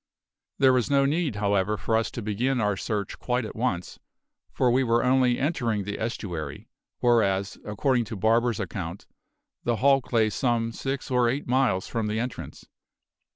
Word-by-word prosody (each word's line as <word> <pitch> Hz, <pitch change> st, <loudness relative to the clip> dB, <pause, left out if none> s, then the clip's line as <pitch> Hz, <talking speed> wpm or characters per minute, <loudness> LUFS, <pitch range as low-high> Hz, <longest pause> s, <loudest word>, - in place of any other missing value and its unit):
There 130 Hz, -1 st, +5 dB
was 125 Hz, -3 st, +1 dB
no 140 Hz, -1 st, +4 dB
need, 150 Hz, -3 st, 0 dB
however, 100 Hz, 0 st, +1 dB
for 110 Hz, -, -1 dB
us 110 Hz, -4 st, +1 dB
to 115 Hz, -, -6 dB
begin 120 Hz, +6 st, 0 dB
our 105 Hz, -2 st, +1 dB
search 100 Hz, 0 st, -3 dB
quite 125 Hz, -1 st, -1 dB
at -, -, -8 dB
once, 110 Hz, -7 st, -2 dB, 0.5 s
for 125 Hz, -2 st, +2 dB
we 130 Hz, +2 st, +3 dB
were 120 Hz, -1 st, +2 dB
only 125 Hz, -1 st, +3 dB
entering 120 Hz, -8 st, 0 dB
the 105 Hz, +1 st, -5 dB
estuary, 85 Hz, -10 st, -5 dB, 0.3 s
whereas, 100 Hz, -5 st, +2 dB
according 120 Hz, +2 st, +1 dB
to 110 Hz, -, -6 dB
Barber's 115 Hz, +3 st, +2 dB
account, 90 Hz, -1 st, -5 dB, 0.6 s
the 120 Hz, -, +1 dB
hulk 135 Hz, +2 st, +2 dB
lay 110 Hz, -3 st, +3 dB
some 115 Hz, 0 st, 0 dB
six 135 Hz, +4 st, -4 dB
or 125 Hz, -2 st, +3 dB
eight 135 Hz, +4 st, -2 dB
miles 125 Hz, -7 st, +2 dB
from 115 Hz, -2 st, -2 dB
the 105 Hz, +1 st, -1 dB
entrance. 120 Hz, +1 st, -6 dB
115 Hz, 165 wpm, -26 LUFS, 105-130 Hz, 0.6 s, There